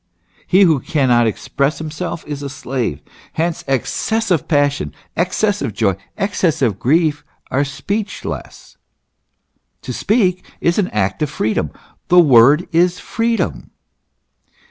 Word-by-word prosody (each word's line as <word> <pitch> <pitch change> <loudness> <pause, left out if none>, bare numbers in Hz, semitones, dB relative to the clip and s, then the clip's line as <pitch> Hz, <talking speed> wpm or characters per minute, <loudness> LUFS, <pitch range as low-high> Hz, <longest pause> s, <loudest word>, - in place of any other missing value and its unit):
He 190 +2 +5
who 160 -6 +4
cannot 125 -4 +2
express 140 +6 -1
himself 160 +2 -5
is 145 -1 -5
a 140 - -4
slave. 130 - -3 0.3
Hence, 165 +1 -1
excessive 180 - 0
passion, 145 -2 +1 0.2
excessive 180 - 0
joy, 100 -4 +1 0.2
excessive 155 - 0
grief, 150 +1 +2 0.3
are 140 +2 +2
speechless. 200 +9 -5 1.1
To - - -5
speak 190 -5 +1 0.2
is 170 +4 +1
an 190 - +2
act 100 +5 -1
of 150 - 0
freedom; 110 - -1 0.4
the 180 - +4
word 140 +2 +6
is 175 +2 +2
freedom. 230 +1 -2
155 Hz, 115 wpm, -18 LUFS, 135-180 Hz, 1.1 s, word